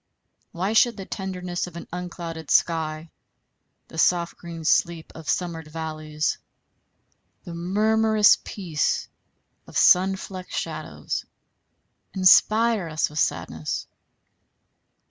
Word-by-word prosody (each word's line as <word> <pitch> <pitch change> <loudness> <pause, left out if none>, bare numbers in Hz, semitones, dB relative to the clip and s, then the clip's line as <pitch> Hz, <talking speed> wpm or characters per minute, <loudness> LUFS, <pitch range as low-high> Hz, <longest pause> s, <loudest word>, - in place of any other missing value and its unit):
Why 190 +5 -2
should 235 0 +4
the 195 - -6
tenderness 180 -3 -4
of 175 - -12
an 170 - -8
unclouded 170 -3 -6
sky, 160 -1 +1 0.8
the 160 - -7
soft 170 0 +2
green 165 -2 -9
sleep 170 0 +1
of 160 -1 -8
summered 165 -3 -2
valleys, 155 -1 -3 1.0
the 170 - -8
murmurous 215 +4 +4
peace 170 -7 -1 0.6
of - - -5
sun 190 +2 +5
flecked 185 -1 -8
shadows, - - -4 0.9
inspire 215 +2 +5
us 155 -1 -1
with 150 - -3
sadness? 80 - -2
175 Hz, 105 wpm, -24 LUFS, 160-190 Hz, 1.0 s, sun